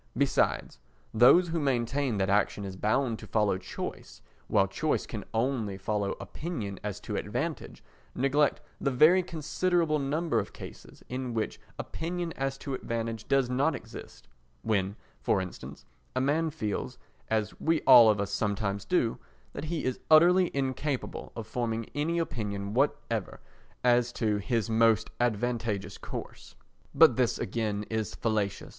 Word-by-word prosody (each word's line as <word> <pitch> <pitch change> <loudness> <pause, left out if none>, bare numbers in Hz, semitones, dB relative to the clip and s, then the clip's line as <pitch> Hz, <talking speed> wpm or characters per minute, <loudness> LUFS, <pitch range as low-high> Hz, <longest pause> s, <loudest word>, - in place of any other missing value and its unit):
Besides, 140 - +1 0.3
those 135 +10 +6
who 165 0 -1
maintain 130 -2 0
that 95 -1 +1
action 100 0 +1
is 95 -1 -6
bound 110 +4 0
to - - -10
follow 105 -4 +1
choice, 60 -8 -7 0.2
while - - +3
choice - - -1
can - - -6
only 115 -4 -1
follow 100 0 -1
opinion 115 - -5
as 105 -2 -4
to - - -5
advantage, - - -4 0.3
neglect 140 +3 +2 0.2
the - - +1
very 155 +8 +6
considerable 165 -1 0
number 150 +4 0
of - - -5
cases - - -11
in 125 -1 -4
which 110 - -2 0.2
opinion 170 +1 -4
as 135 0 -2
to 135 - -5
advantage 115 -3 -4
does 135 -2 +3
not 135 +5 +1
exist—when, 95 - -5 0.3
for - - +2
instance, 90 -1 -8 0.3
a - - +2
man 150 +5 +1
feels, 110 -10 -4 0.3
as 110 -1 0
we 165 0 +1
all 120 -4 +9
of 105 -1 +2
us 100 0 -2
sometimes 100 -1 -1
do, 120 -11 +1 0.3
that - - -5
he 160 0 -2
is 130 -1 -1
utterly 175 +3 +6
incapable 135 0 -2
of 115 - -5
forming 115 -1 -2
any 160 +4 0
opinion 105 -10 -3
whatever 115 -5 -1 0.4
as 120 -1 +3
to 110 -3 0
his 115 +1 -1
most 115 -1 +3
advantageous 115 -3 -1
course. - - -8 0.4
But - - +7
this - - +2
again 105 0 -2
is 110 -3 -2
fallacious. 105 -4 -1
120 Hz, 145 wpm, -29 LUFS, 105-145 Hz, 0.4 s, all